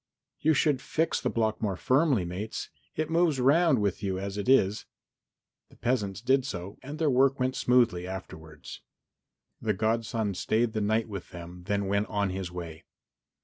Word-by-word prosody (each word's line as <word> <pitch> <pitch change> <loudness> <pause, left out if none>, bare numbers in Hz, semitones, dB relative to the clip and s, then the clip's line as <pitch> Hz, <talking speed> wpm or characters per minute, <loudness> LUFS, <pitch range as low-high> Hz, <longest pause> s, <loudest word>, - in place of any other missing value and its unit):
"You 155 +1 +3
should 140 -2 +2
fix 160 +5 0
the - - 0
block 110 -2 0
more 100 -4 0
firmly, 130 - +2
mates. 95 +6 -5 0.2
It 155 +1 -2
moves 165 -4 +3
round 145 +1 +4
with 100 -1 -1
you 95 -2 -1
as 100 +1 -4
it 105 +4 -3
is." 105 -6 +3 0.8
The - - -19
peasants 105 -5 -1
did 130 +2 +3
so 95 -6 -6
and 145 +3 -7
their 155 -3 +2
work 135 +2 +3
went 130 0 0
smoothly 115 -8 +2
afterwards. 80 -5 -9 0.8
The 110 - +1
godson 110 0 0
stayed 110 +5 0
the 110 - -1
night 110 +2 +1
with 100 -4 -7
them, 90 0 -10
then 100 -1 0
went 100 +2 0
on 100 -2 -1
his 95 -1 -4
way. 85 -2 -7
110 Hz, 170 wpm, -28 LUFS, 95-130 Hz, 0.8 s, round